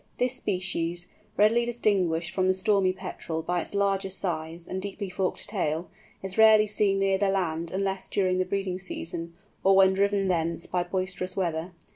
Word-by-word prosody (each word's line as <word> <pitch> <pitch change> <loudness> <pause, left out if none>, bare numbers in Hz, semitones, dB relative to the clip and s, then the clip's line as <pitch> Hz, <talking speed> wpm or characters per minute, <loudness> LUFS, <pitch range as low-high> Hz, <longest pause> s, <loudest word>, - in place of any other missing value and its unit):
This 250 0 +1
species, 175 -3 -2 0.3
readily 220 +3 +4
distinguished 195 -8 0
from 185 -1 +1
the 185 - +3
Stormy 195 -1 +2
Petrel 180 -3 -5
by 175 +1 0
its 200 - -7
larger 195 -1 +1
size 170 -3 -4
and 190 - -4
deeply 200 0 -5
forked 185 0 -2
tail, 175 -5 -2 0.3
is 190 +2 -3
rarely 220 -1 +7
seen 205 -1 +1
near 195 -1 +2
the 200 -1 +2
land 170 -4 -1
unless 195 +1 -2
during 185 -2 +1
the 185 - +2
breeding 185 -1 -2
season, 170 -2 -6 0.3
or 195 0 +5
when 190 0 +6
driven 200 0 +1
thence 170 -2 -1
by 180 - -1
boisterous 185 +1 -3
weather. 170 -1 -2
190 Hz, 170 wpm, -27 LUFS, 175-195 Hz, 0.3 s, rarely